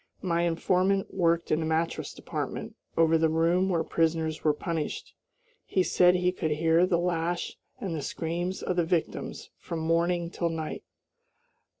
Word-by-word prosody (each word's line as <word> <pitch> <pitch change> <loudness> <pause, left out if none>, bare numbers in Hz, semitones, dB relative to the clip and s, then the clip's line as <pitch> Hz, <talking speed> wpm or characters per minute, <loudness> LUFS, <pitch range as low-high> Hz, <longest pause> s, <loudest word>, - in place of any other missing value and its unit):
My 170 -2 +1
informant 185 +3 +1
worked 170 -2 +1
in 155 - +3
the 160 - -1
mattress 160 +1 -1
department, - - -5 0.2
over 165 0 +4
the 160 0 +3
room 170 +4 +2
where 170 -3 +1
prisoners 160 -1 0
were 155 - +4
punished. 160 +1 -4 0.5
He 185 - +1
said 180 0 +4
he 180 0 +2
could 175 -3 -2
hear 165 +3 +3
the 180 -2 +2
lash 170 0 -1 0.2
and 195 -8 -3
the 155 - -3
screams 175 +5 -3
of 180 - -1
the 175 - +4
victims 165 0 -2
from 170 - -5
morning 170 +1 +1
till 170 -2 -1
night. 160 -1 -4
170 Hz, 160 wpm, -28 LUFS, 160-180 Hz, 0.5 s, over